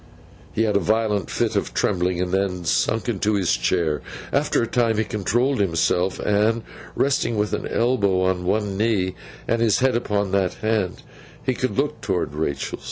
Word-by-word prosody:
He 110 - 0
had 105 -2 +1
a - - +5
violent 105 -1 0
fit - - -1
of - - -1
trembling, 90 -2 +1
and 90 0 -1
then 95 -2 -1
sunk 110 - +1
into 105 -2 0
his 95 -9 +2
chair. 75 +6 0 0.3
After - - +2
a - - -1
time 115 -2 +1
he 110 - +2
controlled 120 +6 0
himself, 90 0 +1
and, 110 +3 +1 0.3
resting 130 -5 +1
with 105 -1 0
an - - -2
elbow 100 -6 +1
on 95 -1 0
one 100 +1 0
knee, 105 -5 +1 0.3
and 115 0 +1
his 110 -4 +3
head 130 -1 +2
upon 105 -4 0
that 95 -2 +1
hand, 110 -4 -1 0.4
could 130 -4 -1
look 145 +2 -1
towards 90 -7 -1
Rachael. 75 -2 -3
105 Hz, 170 wpm, -23 LUFS, 90-115 Hz, 0.4 s, a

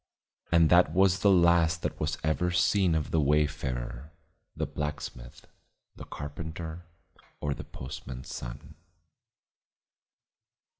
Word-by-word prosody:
And 85 -2 +5
that 85 -3 +6
was 95 +1 +4
the 100 - +4
last 85 -3 +4
that - - -3
was 75 0 -1
ever 80 +3 +1
seen 90 -1 +3
of 80 -2 -2
the 80 - +3
wayfarer; 70 -2 -1 0.4
the - - -1
blacksmith, 75 -5 -6 0.5
the - - -9
carpenter 80 +3 -7 0.5
or 75 -1 -1
the - - -8
postman's 65 0 -8
son. - - -8
80 Hz, 110 wpm, -29 LUFS, 70-85 Hz, 0.5 s, that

